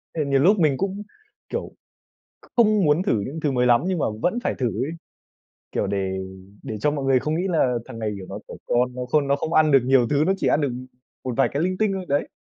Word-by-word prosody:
Thì 155 -3 0
nhiều 140 -1 +2
lúc 195 +8 +4
mình 150 -5 +3
cũng, 195 +4 -3 0.5
kiểu, - - -4 0.7
kh - - -19
không 215 -5 +4
muốn 150 +5 +3
thử 115 - +1
những 140 +10 -5
thứ 150 -2 0
mới 125 -1 +1
lắm, 120 +2 +4
nhưng 185 -3 0
mà - - +1 0.2
vẫn 225 +7 +1
phải - - -1
thử 130 - 0
ấy, 125 +7 -2 0.8
kiểu, - - -1
để 95 -1 -2 0.5
để 110 - -5
cho 145 +8 +1
mọi 140 -2 -3
người 130 -1 +4
không 155 +4 -2
nghĩ 180 +3 -1
là 155 -8 +2
thằng 115 - -9
này, 110 -1 -2
kiểu, 95 - -8
nó 100 +1 -6
trẻ - - -9
con 125 +1 +1
nó 125 0 -4
khôn 140 +2 +1
nó 140 - +3
không 160 +3 -4
ăn 155 -1 +4
được 135 - +7
nhiều 130 -2 +4
thứ, 145 0 +2
nó 190 - +3
chỉ - - 0
ăn 150 - +3
được 145 - +1 0.5
một 130 -2 -3
vài 135 - +3
cái 145 +4 -1
linh 185 0 -1
tinh 215 -2 +1
thôi, 190 -1 -4
đấy. 145 +1 0
140 Hz, 260 wpm, -23 LUFS, 125-170 Hz, 0.8 s, được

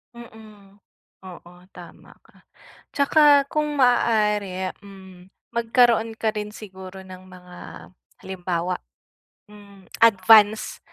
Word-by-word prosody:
Mm, 215 -4 -16 0.5
oo, 175 -1 -13 0.2
tama 175 -2 -15
ka. - - -26 0.5
Tsaka 285 0 +4
kung 300 -1 -2
maaari, 210 -7 0
hmm, 190 -2 -15 0.2
magkaroon 230 -1 +1
ka 220 -1 -2
rin 210 -1 -6
siguro 190 -2 -11
ng 185 0 -14
mga 180 -1 -15 0.7
halimbawa, 180 -1 -4 0.7
hmm, 200 -2 -18
advance 215 0 +4
205 Hz, 95 wpm, -22 LUFS, 185-225 Hz, 0.7 s, Tsaka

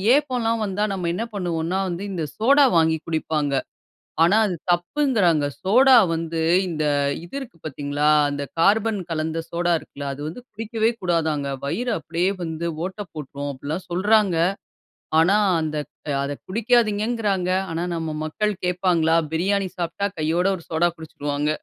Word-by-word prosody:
ஏப்பம்லாம் 245 -6 0
வந்தா, 205 +1 -1
நம்ம 180 -3 -3
என்ன 220 - -2
பண்ணுவோனா, 175 -1 -1
வந்து 175 +2 -4
இந்த 170 -4 -2
சோடா 275 +6 +5
வாங்கி 160 0 +3
குடிப்பாங்க. 155 -3 -1 0.7
ஆனா 195 +6 +4
அது 185 - -1
தப்புங்க்கிறாங்க. 175 - +2 0.2
சோடா 255 +8 +5 0.2
வந்து 165 0 -2 0.3
இந்த 155 -3 -2 0.4
இது 175 - -10
இருக்கு 240 -11 -10
பார்த்தீங்களா? 145 0 -1 0.2
அந்த 145 0 -3 0.2
கார்பன் 210 +3 +3
கலந்த 160 0 -2
சோடா 175 0 +1
இருக்குல்ல 140 -2 -7
அது 140 - -9
வந்து 165 +10 -7
குடிக்கவே 225 +1 -1
கூடாதாங்க! 160 -5 0 0.2
"வயிறு 240 - -1
அப்டியே 170 +4 -1
வந்து 165 0 -3 0.2
ஓட்டை 190 +2 -5
போட்டுரும்" 145 -2 -6
அப்படிலாம் 150 +7 -5
சொல்றாங்க. 200 0 +3 0.8
ஆனா, 180 +5 +4 0.3
அந்த 155 -1 -2 0.5
அத 140 0 -4
குடிக்காதீங்கங்கறாங்க. 215 -3 +1 0.2
ஆனா 170 +2 -2
நம்ம 160 -2 -3
மக்கள் 210 +7 -1
கேப்பாங்களா? 175 -3 +2 0.2
பிரியாணி 195 +3 +1
சாப்பிட்டா, 180 +3 -1
கையோட 165 +4 +1
ஒரு 170 - -13
சோடா 170 +2 +2
குடிச்சுருவாங்க. 145 -2 -3
175 Hz, 135 wpm, -23 LUFS, 160-205 Hz, 0.8 s, சோடா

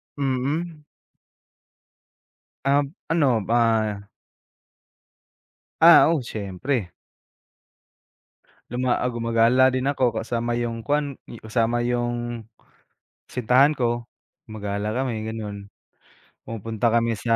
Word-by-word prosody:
Mm. 145 +4 -2 1.8
Um, 140 +2 +2 0.2
ano, 130 - +2
ah 110 -3 +1 1.7
Ah, 165 0 +8
oo, 160 -5 +1
siyempre. 105 0 -3 1.8
Luma 125 0 0
ah, 125 - 0
gumagala 120 +2 +3
din 130 +1 -1
ako 130 -4 +2
kasama 120 +1 -2
yung 115 -1 -3
kuan, 145 -2 -1 0.2
kasama 115 +1 0
yung, 120 -1 -2 0.8
kasintahan 125 +4 +3
ko. 120 -4 -1 0.4
Gumagala 105 -1 -4
kami, 120 -3 -2
gano'n. 105 -2 -6 0.8
Pumupunta 115 +1 -2
kami 115 0 +2
sa, 115 +2 0
120 Hz, 85 wpm, -23 LUFS, 115-130 Hz, 1.8 s, Ah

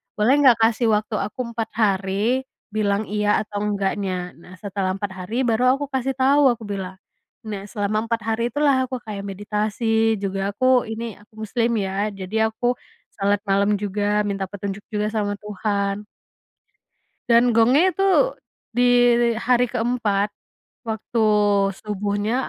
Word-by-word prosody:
"Boleh 215 +5 +3
nggak, 260 -5 +7
kasih 230 +1 +2
waktu 215 +1 -2
aku 205 +5 -5
4 225 -1 -3
hari 210 +4 +1 0.2
bilang 205 -1 0
iya 210 0 +1
atau 205 -1 -6
enggaknya?" 195 -3 -2
Nah, 180 +1 -13
"Setelah 195 -2 -2
4 200 0 -4
hari 190 +8 -3
baru 245 +3 +3
aku 285 +1 -4
kasih 265 0 -1
tahu," 275 +2 +4
aku 230 - -13
bilang. 190 -2 -5 0.5
Nah, 205 -2 -6
selama 215 +1 -2
4 230 -1 -1
hari 225 +2 0
itulah 275 -1 +2
aku 255 - -4
kayak 200 -2 -6
meditasi, 215 +3 0
juga 195 0 -2 0.2
aku 255 0 +3
ini, 225 +1 -5 0.2
aku 210 +3 -23
muslim 230 +2 0
ya, 195 +2 -1
jadi 210 +4 0
aku 240 +2 -1 0.5
sholat 200 +1 +1
malam 200 +1 +3
juga 205 +1 0
minta 195 -2 -2
petunjuk 200 +1 -6
juga 210 0 0
sama 210 -2 -1
Tuhan. 205 0 -2 1.2
Dan 235 +1 +5
gongnya 255 +11 +4
itu 390 +7 +3 0.4
di 245 +2 +2 0.5
hari 245 +2 +2
ke-4 225 -4 0 0.6
waktu 220 +1 -2 0.6
subuhnya, 210 +4 -1
215 Hz, 140 wpm, -22 LUFS, 200-235 Hz, 1.2 s, nggak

